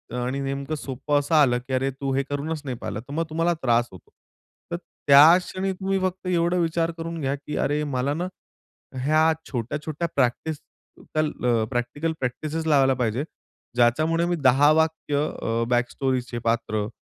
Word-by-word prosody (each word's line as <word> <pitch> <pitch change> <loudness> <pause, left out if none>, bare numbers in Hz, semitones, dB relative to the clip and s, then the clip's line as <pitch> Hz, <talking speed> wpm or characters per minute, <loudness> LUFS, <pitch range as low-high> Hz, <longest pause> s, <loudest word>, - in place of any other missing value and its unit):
आणि 125 +2 -2
नेमकं 140 +2 -3
सोपं 145 +1 -1
असं 145 +3 0
आलं 125 -5 +4
की, 130 +1 -7
"अरे! 135 +1 +1
तू 135 +1 -4
हे 140 - +1
करूनच 145 +3 -4
नाही 130 -3 -4
पाहिलं", 105 -2 -5
तर 140 +4 -11
मग 165 +2 0
तुम्हाला 165 +2 +1
त्रास 120 -1 +2
होतो. 95 - -15 0.6
तर 170 - -1 0.3
त्या 150 +5 +9
क्षणी 190 +1 -3
तुम्ही 195 +1 -1
फक्त 185 0 -3
एवढं 175 0 +1
विचार 165 0 0
करून 165 0 -5
घ्या 135 0 0
की 145 +1 -7
"अरे! 150 +1 0
मला 140 -1 -1
ना 175 +4 -2 0.8
ह्या 155 +3 +4 0.2
छोट्या-छोट्या 150 +6 -3
प्रॅक्टिस 140 +4 0 0.6
कल 155 -1 +1 0.2
अ, 115 -2 +2
प्रॅक्टिकल 135 +7 -2
प्रॅक्टिसेस 155 +6 -3
लावायला 135 -3 +4
पाहिजे." 120 +4 0 0.5
ज्याच्यामुळे 155 +8 +3
मी 175 0 0
10 140 0 +5
वाक्य 160 -2 0 0.3
अ, 115 +1 0
बॅकस्टोरीचे 125 0 -1
पात्र 110 -2 0
145 Hz, 160 wpm, -24 LUFS, 125-160 Hz, 0.8 s, त्या